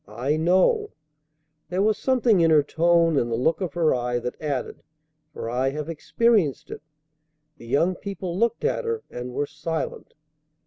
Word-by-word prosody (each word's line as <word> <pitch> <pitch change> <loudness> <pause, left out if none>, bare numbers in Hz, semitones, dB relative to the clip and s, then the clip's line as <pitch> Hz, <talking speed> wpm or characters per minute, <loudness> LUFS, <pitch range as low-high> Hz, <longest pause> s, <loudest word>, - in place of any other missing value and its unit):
"I 125 +8 -1
know." 185 - +2 0.8
There 185 +3 0
was 215 0 +3
something 240 -7 +2
in 165 - +4
her 155 -2 +5
tone 165 0 +3
and 120 - -2
the - - +1
look 160 +11 0
of 175 -6 -3
her 165 -2 +3
eye 125 0 -1
that 125 +1 -5
added, 145 -5 -3 0.5
"For 135 - -6
I 125 +3 0
have 150 +3 -5
experienced 185 - +1
it." - - -7 0.8
The 115 - -13
young 165 +9 +2
people 185 -2 -5
looked 235 - 0
at 485 - 0
her, 460 -1 -3
and 125 +1 -6
were 145 +4 -1
silent. 155 +3 -5
165 Hz, 170 wpm, -24 LUFS, 135-195 Hz, 0.8 s, her